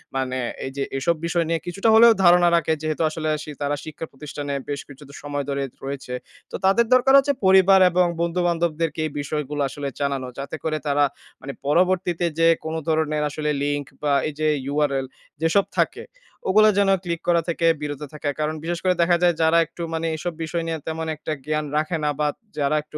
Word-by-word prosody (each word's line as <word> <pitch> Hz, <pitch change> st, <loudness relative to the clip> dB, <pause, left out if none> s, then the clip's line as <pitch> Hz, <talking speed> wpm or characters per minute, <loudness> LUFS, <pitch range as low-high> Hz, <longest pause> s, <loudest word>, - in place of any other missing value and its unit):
মানে 130 Hz, -1 st, -1 dB, 0.3 s
এইযে 135 Hz, +1 st, -3 dB
এসব 150 Hz, +6 st, +1 dB
বিষয় 170 Hz, 0 st, 0 dB
নিয়ে 165 Hz, 0 st, +1 dB
কিছুটা 195 Hz, +5 st, 0 dB
হলেও 230 Hz, +1 st, +8 dB
ধারণা 175 Hz, 0 st, +6 dB
রাখে, 165 Hz, -1 st, +2 dB
যেহেতু 155 Hz, 0 st, -2 dB
আসলে 155 Hz, 0 st, -3 dB
শি 150 Hz, -, -8 dB
তারা 145 Hz, 0 st, 0 dB
শিক্ষা 155 Hz, +1 st, -7 dB
প্রতিষ্ঠানে 145 Hz, 0 st, -6 dB, 0.2 s
বেশ 145 Hz, -1 st, -2 dB
কিছুটা 140 Hz, 0 st, -13 dB
সময় 145 Hz, -1 st, -3 dB
ধরে 140 Hz, 0 st, -1 dB, 0.2 s
রয়েছে। 135 Hz, -2 st, -5 dB, 0.4 s
তো -, -, -5 dB
তাদের 195 Hz, +5 st, +4 dB
দরকার 255 Hz, +1 st, +5 dB
হচ্ছে 280 Hz, +1 st, +3 dB
পরিবার 190 Hz, 0 st, +6 dB
এবং 180 Hz, +1 st, +3 dB, 0.2 s
বন্ধু-বান্ধবদেরকে 170 Hz, -2 st, 0 dB
এই 155 Hz, -, -3 dB
বিষয়গুলো 150 Hz, 0 st, -3 dB
আসলে 145 Hz, +1 st, -5 dB
জানানো। 140 Hz, -2 st, -1 dB
যাতে 140 Hz, +2 st, -5 dB
করে 155 Hz, -1 st, -1 dB
তারা 145 Hz, 0 st, +3 dB, 0.4 s
মানে 140 Hz, -, -6 dB
পরবর্তীতে 175 Hz, +2 st, +2 dB
যেয়ে 165 Hz, 0 st, +5 dB
কোনো 160 Hz, 0 st, -2 dB
ধরনের 155 Hz, -1 st, +1 dB
আসলে 150 Hz, +1 st, -3 dB
লিঙ্ক 145 Hz, 0 st, -1 dB, 0.2 s
বা 145 Hz, -1 st, +2 dB
এই 155 Hz, -, -4 dB
যে 155 Hz, -, +1 dB, 0.3 s
URL 140 Hz, -3 st, +1 dB, 0.4 s
যেসব 165 Hz, +5 st, +3 dB
থাকে, -, -, 0 dB, 0.4 s
ওগুলা 215 Hz, +3 st, +6 dB
যেন 200 Hz, -1 st, +3 dB
ক্লিক 170 Hz, -2 st, -3 dB
করা 170 Hz, -1 st, +4 dB
থেকে 170 Hz, 0 st, -1 dB, 0.2 s
বিরত 145 Hz, -1 st, -4 dB
থাকে। 150 Hz, -1 st, -3 dB
কারণ 155 Hz, +1 st, -1 dB
বিশেষ 170 Hz, +1 st, -2 dB
করে 185 Hz, -1 st, +3 dB
দেখা 170 Hz, +1 st, +4 dB
যায় 175 Hz, -1 st, +4 dB
যারা 160 Hz, +1 st, +4 dB
একটু 165 Hz, +2 st, -11 dB
মানে 165 Hz, 0 st, -1 dB
এসব 175 Hz, +2 st, -4 dB
বিষয় 165 Hz, +1 st, -2 dB
নিয়ে 165 Hz, -1 st, -2 dB
তেমন 160 Hz, 0 st, -3 dB
একটা 155 Hz, -, -6 dB
জ্ঞান 155 Hz, 0 st, -1 dB
রাখে 155 Hz, +3 st, 0 dB
না 150 Hz, -, +2 dB
বা 150 Hz, -, +2 dB, 0.3 s
যারা 145 Hz, 0 st, +1 dB
একটু 155 Hz, 0 st, -10 dB
160 Hz, 190 wpm, -23 LUFS, 145-175 Hz, 0.4 s, হলেও